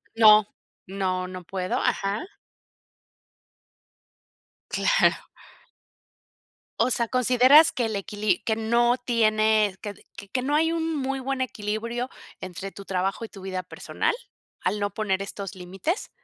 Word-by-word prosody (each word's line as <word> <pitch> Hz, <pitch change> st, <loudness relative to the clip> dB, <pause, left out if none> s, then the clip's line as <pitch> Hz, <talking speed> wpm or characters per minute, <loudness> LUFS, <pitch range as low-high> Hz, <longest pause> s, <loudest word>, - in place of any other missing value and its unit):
No, 215 Hz, -2 st, +7 dB, 0.4 s
no 185 Hz, -1 st, -2 dB
no 185 Hz, -1 st, -8 dB
puedo, 185 Hz, +1 st, -3 dB
ajá. 200 Hz, -, 0 dB, 2.4 s
Claro -, -, +2 dB, 1.5 s
O 245 Hz, +2 st, +3 dB
sea, 235 Hz, 0 st, 0 dB
¿consideras 255 Hz, +5 st, +6 dB
que 240 Hz, -, -1 dB
el 220 Hz, -2 st, -2 dB
equili 205 Hz, -1 st, 0 dB
que 220 Hz, -, +1 dB
no 235 Hz, +2 st, +2 dB
tiene, 215 Hz, -3 st, +3 dB
que 205 Hz, -2 st, -6 dB, 0.4 s
que 255 Hz, -, 0 dB
no 285 Hz, +2 st, -1 dB
hay 325 Hz, +2 st, +3 dB
un 325 Hz, -1 st, -1 dB
muy 270 Hz, -1 st, -2 dB
buen 265 Hz, 0 st, -2 dB
equilibrio 235 Hz, +1 st, -3 dB, 0.3 s
entre 185 Hz, +1 st, -7 dB
tu 200 Hz, -, -11 dB
trabajo 195 Hz, +4 st, -2 dB
y -, -, -11 dB
tu 195 Hz, -, -12 dB
vida 185 Hz, -1 st, -4 dB
personal?, -, -, -2 dB, 0.5 s
¿al 205 Hz, +3 st, -1 dB
no 205 Hz, 0 st, -2 dB
poner 195 Hz, -3 st, -1 dB
estos 200 Hz, -1 st, -7 dB
límites? 190 Hz, -, -4 dB
215 Hz, 130 wpm, -25 LUFS, 195-250 Hz, 2.4 s, No